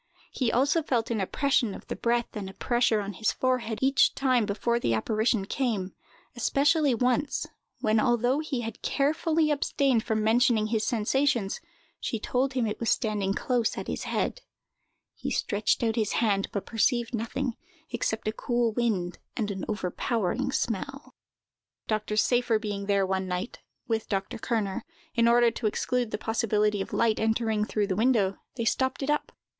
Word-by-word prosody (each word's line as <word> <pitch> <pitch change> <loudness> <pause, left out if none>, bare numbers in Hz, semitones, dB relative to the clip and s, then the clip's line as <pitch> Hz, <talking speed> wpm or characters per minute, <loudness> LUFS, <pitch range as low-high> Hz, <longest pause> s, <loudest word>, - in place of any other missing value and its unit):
He 250 -4 0
also 280 +7 +3
felt 240 -6 -1
an 220 -3 0
oppression 240 0 +1
of - - -11
the - - -4
breath 235 0 0
and 200 -3 -4
a 190 - -12
pressure 240 -3 +2
on 200 0 -5
his 215 +4 0
forehead 250 -4 0
each 270 +1 +4
time 255 -5 +2
before 235 +3 0
the 115 - +1
apparition 215 - +1
came, 210 -6 -1 0.4
especially 280 +3 +3
once, 250 +4 +1 0.4
when, 215 0 +3
although 245 +3 +2
he 305 -5 -2
had 225 -2 -6
carefully 310 +2 +1
abstained 275 -4 +1
from 220 -2 0
mentioning 230 0 +3
his 220 -1 +1
sensations, 235 -1 +1 0.4
she 225 - -2
told 260 +5 0
him 255 -3 +1
it 210 - -3
was 230 - 0
standing 205 -3 0
close 240 -3 0
at - - -4
his - - -3
head. - - -1 0.7
He - - -5
stretched 210 +3 0
out 225 -1 +1
his 215 -3 0
hand, 205 -4 +1
but 200 - -3
perceived 235 +1 +1
nothing, 235 +3 -2 0.4
except 225 -2 -2
a - - +2
cool 240 0 0
wind 210 -7 -1 0.2
and 210 -4 -1
an 190 -2 -4
overpowering 210 +4 -1
smell. 270 +5 -3 0.7
Dr. 215 -1 -1
Seyffer 240 +1 +3
being 205 -2 -4
there 200 -1 +3
one 190 0 -1
night, 180 +5 -4 0.3
with 225 -1 -1
Dr. 195 +1 -2
Kerner, 215 -5 -1 0.3
in 235 -2 +3
order 235 0 +5
to 225 0 -2
exclude 245 +2 0
the - - -3
possibility 210 -2 +1
of - - -5
light 225 -2 +2
entering 220 -1 +1
through 210 -1 0
the 195 -2 -1
window, 215 -3 +2 0.2
they 230 -3 -2
stopped 260 +4 0
it 270 - -2
up. 295 - -1
230 Hz, 170 wpm, -27 LUFS, 210-250 Hz, 0.7 s, order